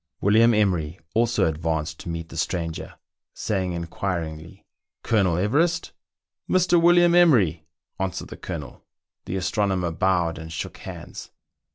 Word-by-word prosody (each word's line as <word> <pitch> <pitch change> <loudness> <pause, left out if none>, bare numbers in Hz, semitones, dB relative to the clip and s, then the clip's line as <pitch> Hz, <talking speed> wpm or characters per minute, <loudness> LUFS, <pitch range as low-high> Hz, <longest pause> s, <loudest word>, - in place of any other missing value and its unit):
William 110 +4 +5
Emery 90 -6 +1
also 120 +1 +2
advanced 80 -1 -2
to - - -7
meet 85 0 -5
the - - -10
stranger, 80 0 -3 0.4
saying 95 -4 -1
in 85 0 -3
quiringly, 85 0 -5 0.4
"Colonel 95 -7 +2
Everest?" 160 - +1 0.6
"Mr. 175 -2 +4
William 175 0 +5
Emery.?" 105 - +4 0.3
answered 95 -2 -3
the - - -9
Colonel. 75 -6 -7 0.4
The - - -4
astronomer 95 -1 0
bowed 85 -1 +1
and 80 0 -8
shook 85 - -5
hands. - - -9
90 Hz, 130 wpm, -24 LUFS, 80-110 Hz, 0.6 s, William